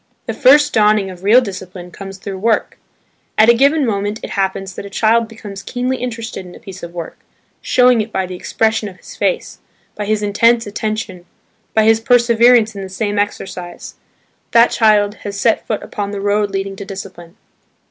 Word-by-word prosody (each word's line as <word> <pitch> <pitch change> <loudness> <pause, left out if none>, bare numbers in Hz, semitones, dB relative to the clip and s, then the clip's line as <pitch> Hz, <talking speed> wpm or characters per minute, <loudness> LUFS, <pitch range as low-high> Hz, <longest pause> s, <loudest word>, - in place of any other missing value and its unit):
The - - -3
first 290 +3 +5
dawning 210 -2 +3
of 180 0 -13
real 225 +6 +6
discipline 185 -4 -8
comes 195 +1 -9
through 195 -1 -7
work. 225 +2 0 0.6
At 220 +2 +6
a - - +8
given 280 +4 +3
moment 205 -1 -2
it - - -6
happens 195 -1 -2
that - - -7
a 200 - -9
child 225 +3 +2
becomes 210 -3 -9
keenly 250 +3 -2
interested 230 -5 -5
in 180 -1 -12
a - - -13
piece 190 -1 -11
of 170 - -8
work, 170 -2 -7 0.4
showing 250 -2 +4
it 220 +1 -6
by 190 - -1
the 185 - -8
expression 220 +3 -1
of 185 - -15
his - - -13
face, - - -2 0.3
by 210 - -5
his 215 0 0
intense 230 +3 +3
attention, 210 -3 -4 0.5
by 220 - +4
his 225 +1 +4
perseverance 235 -1 +4
in 200 - -6
the 190 - -7
same 205 +1 -2
exercise. 190 -3 -5 0.6
That 235 +1 +6
child 210 -2 +3
has 200 -1 -6
set 225 +2 +1
foot 215 - -2
upon 205 -1 -4
the 200 -1 -5
road 205 +1 +1
leading 195 0 -4
to 200 - -6
discipline. 190 -2 -9
210 Hz, 190 wpm, -17 LUFS, 195-230 Hz, 0.6 s, a